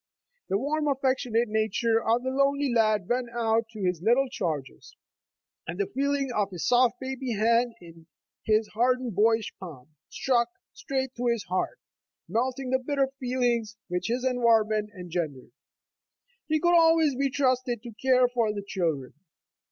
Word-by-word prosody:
The 195 - +2
warm, 300 +6 -1
affectionate 260 -4 +1
nature 220 +1 +1
of 230 +2 +1
the 260 - -1
lonely 275 0 +1
lad 215 -5 +2
went 245 0 -1
out 225 -1 +1
to 215 -3 -7
his 180 -3 0
little 240 +7 +3
charges, 155 - -5 0.7
and 170 +3 -5
the 200 - +2
feeling 275 +3 -1
of 200 -2 0
a 180 - -7
soft 245 - +3
baby 260 -2 -4
hand 230 +3 +2
in 165 -1 -15 0.4
his 215 0 +2
hardened 250 +1 0
boyish 220 +2 +2
palm, 155 -8 -10 0.2
struck 240 -3 +1 0.2
straight 265 -1 -3
to 245 +1 -1
his 235 -4 0
heart, 185 - -2 0.5
melting 255 +6 -2
the 260 - +3
bitter 275 0 0
feelings 240 -4 -1
which 180 0 -2
his 245 +2 -1
environment 225 -4 +2
engendered. 165 -8 -4 1.0
He 310 0 +1
could 345 +2 +3
always 325 -4 +4
be 275 +1 0
trusted 255 -3 0
to 235 - -8
care 255 +2 +3
for 235 -3 0
the 205 -1 -5
children. 160 -10 -2
235 Hz, 150 wpm, -27 LUFS, 210-260 Hz, 1.0 s, always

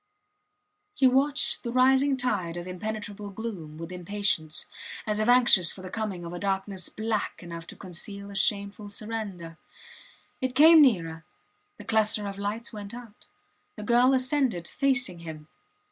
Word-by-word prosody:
He 270 - +3
watched 275 +3 +3
the 235 - -4
rising 265 +2 +4
tide 195 -9 -1
of 175 - -5
impenetrable 205 +2 -5
gloom 190 -8 -6
with 165 +2 -7
impatience, 180 -3 -1 0.4
as 210 -1 -1
if 215 +2 +1
anxious 240 -8 +6
for 190 - -11
the 185 - -8
coming 195 -5 -3
of 170 - -6
a 175 - -5
darkness 195 -1 -2
black 215 -3 -3
enough 170 -1 -8
to - - -8
conceal 200 +2 -7
a - - -9
shameful 200 +1 0
surrender. 200 -6 -6 0.8
It 260 -1 -2
came 315 +3 +9
nearer. 165 - +2 0.5
The - - -11
cluster 215 -2 +2
of 200 0 -6
lights 215 +4 -4
went 210 +1 -7
out. 235 -4 -12 0.5
The 210 - -7
girl 245 +4 +4
ascended 255 - +1
facing 250 -10 0
him. 155 -2 -9
205 Hz, 150 wpm, -27 LUFS, 180-240 Hz, 0.8 s, came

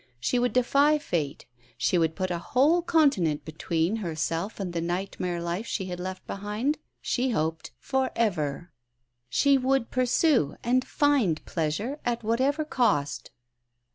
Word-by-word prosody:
She 245 - +1
would 245 0 +1
defy 280 +4 +4
fate; 160 - -3 0.3
she 120 +8 +2
would 160 -1 +1
put 185 +1 -2
a 170 - -1
whole 280 - +3
continent 280 - +2
between 165 +5 -1
herself 170 +1 -3
and 185 -3 -3
the 170 - -1
nightmare 175 0 -2
life 170 +6 -3
she 190 - -2
had 180 -1 -5
left 185 +1 -6
behind, 210 +9 -2 0.2
she 260 +1 0
hoped 160 -7 -1
for 265 -1 -1
ever. 170 -7 -1 0.6
She 280 - +4
would 260 -2 +1
pursue 255 - +2
and 255 +2 +2
find 260 - +1
pleasure 195 - -2
at 240 -1 -1
whatever 265 +7 +1
cost. 145 - 0
205 Hz, 140 wpm, -27 LUFS, 170-260 Hz, 0.6 s, defy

